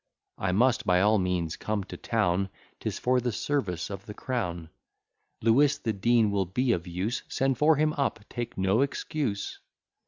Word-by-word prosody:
I 95 - 0
must 120 +5 +3
by 90 -4 +3
all 105 +2 +4
means 90 -3 -1
come 105 -2 -2
to 95 - -9
town, 90 +2 0 0.3
'Tis - - -3
for 125 0 +2
the 120 0 -1
service 105 - -2
of 100 0 -7
the 105 - -7
crown. 90 -11 -3 0.7
"Lewis, 140 +6 +4
the 110 - -2
Dean 110 +1 +3
will 100 -2 0
be 125 +7 +1
of 90 -4 -1
use; 95 +8 -2
Send 135 -1 0
for 155 +1 +5
him 155 +1 +2
up, 140 -5 -1
take 120 -1 -5
no 95 +5 +2
excuse." 140 -5 -2
110 Hz, 175 wpm, -28 LUFS, 95-130 Hz, 0.7 s, for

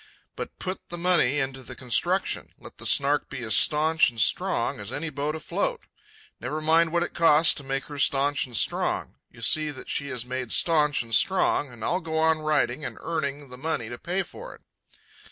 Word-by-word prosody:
But - - -7
put 185 0 -4
the 175 - -5
money 170 -6 +3
into 135 -1 -2
the 130 0 -9
construction. 125 -2 0
Let - - -13
the - - -3
Snark 140 +1 +2
be 135 -3 -6
as 110 - +1
staunch 155 +1 +4
and 115 -2 -10
strong - - +1
as 105 +2 -6
any 155 +4 -4
boat 145 +2 -2
afloat. 160 - -2 0.6
Never 155 - -4
mind 160 +1 +3
what 170 0 +1
it - - -5
costs 165 -1 +5
to 145 - -6
make 135 0 -2
her 145 -1 -9
staunch 140 0 +2
and 120 -3 -5
strong; - - -1
you - - -16
see 155 -1 +2
that 140 -3 -9
she 140 - -2
is 125 -2 -4
made 130 -1 -4
staunch 150 -5 +3
and 115 0 -10
strong, 185 - +2
and 120 -2 -10
I'll 180 +2 0
go 160 -1 -3
on 160 0 +3
writing 155 -3 0
and - - -5
earning 145 -3 -3
the 125 0 -11
money 140 -7 -2
to 120 - -7
pay 180 +3 -1
for 485 - -11
it." - - -22
145 Hz, 205 wpm, -26 LUFS, 130-160 Hz, 0.6 s, costs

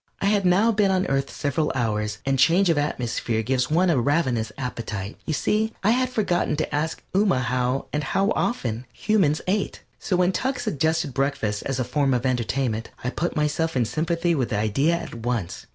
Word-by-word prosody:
I - - -1
had 200 -2 +3
now 200 +6 +4
been 205 -2 +2
on 190 0 +2
Earth 135 0 0
several 150 +1 -1
hours, 105 -4 -1
and 135 -1 +1
change 170 +6 +5
of 160 - 0
atmosphere 120 -5 -1
gives 130 +2 0
one 175 +3 +3
a 135 -7 +2
ravenous 125 -6 +1
appetite. 115 -6 -4
You 155 - 0
see, 220 +8 0
I 210 - +4
had 255 +1 +2
forgotten 200 -10 0
to 155 0 -3
ask 155 +2 -2
Ooma 195 -7 +3
how, 125 +2 0
and 150 0 0
how 195 +9 +1
often, 120 - -2
humans 175 - +1
ate, 200 +2 -1 0.2
so 190 - -1
when 180 +1 +3
Tuck 260 +6 -1
suggested 160 - 0
breakfast 135 -6 -1
as 135 -1 -2
a - - +2
form 135 0 +1
of 125 +1 -2
entertainment 125 -2 -1
I 125 - -1
put 175 +5 -2
myself 150 +2 0
in 120 - +2
sympathy 170 - 0
with 130 -7 0
the 105 - -1
idea 125 +11 +2
at 170 - -6
once. 115 -6 -3
145 Hz, 195 wpm, -24 LUFS, 125-180 Hz, 0.2 s, change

